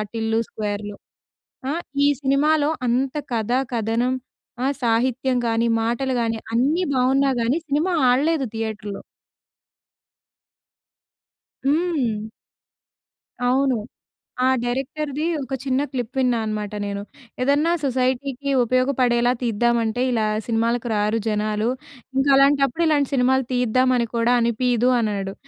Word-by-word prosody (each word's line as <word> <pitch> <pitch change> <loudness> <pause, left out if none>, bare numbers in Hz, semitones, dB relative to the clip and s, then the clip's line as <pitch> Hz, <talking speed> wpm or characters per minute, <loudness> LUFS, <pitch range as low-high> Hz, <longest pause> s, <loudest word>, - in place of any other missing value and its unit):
'టిల్లు 225 0 0
స్క్వేర్‌లో.' 205 -1 -4 0.8
ఆ! - - 0 0.3
ఈ - - +5
సినిమాలో 290 +2 +2 0.2
అంత 255 +3 0 0.2
కథ, 225 0 -1 0.2
కథనం 230 +3 0 0.5
ఆ! 265 - +2 0.2
సాహిత్యం 250 +2 +1
కాని, 230 +1 +1
మాటలు 240 +4 -1
గాని 225 -1 -1 0.2
అన్నీ 285 +10 +2
బాగున్నా 265 +2 +3
గాని, 235 +6 +1
సినిమా 305 +6 +1 0.2
ఆడలేదు 280 +3 +2
థియేటర్‌లో. 215 -2 -4 2.7
హ్మ్. 285 -8 +1 1.3
అవును. 265 0 +2 0.7
ఆ - - +4 0.2
డైరెక్టర్‌ది 275 +4 -3 0.2
ఒక 270 - -5
చిన్న 265 0 +1
క్లిప్ 250 -2 -4
విన్నా 250 -2 +2
అన్నమాట 210 -1 -3
నేను. 200 0 -4 0.4
ఏదన్నా 290 +5 +2
సొసైటీ‌కి 260 +1 -1
ఉపయోగపడేలా 250 -1 +2
తీద్దామంటే 235 +1 +1
ఇలా 225 -3 +1 0.2
సినిమాలకు 230 +1 0
రారు 210 +2 +1
జనాలు, 215 +1 0 0.5
ఇంక 270 +1 +2
అలాంటప్పుడు 275 +3 +3
ఇలాంటి 290 -3 +2
సినిమాలు 265 0 +3
తీద్దామని 255 +1 +2
అని 235 - +1
కూడా 235 +1 +3
అనిపియదు 240 +1 +2
అన్నాడు. 200 -3 -2
245 Hz, 110 wpm, -22 LUFS, 225-270 Hz, 2.7 s, ఈ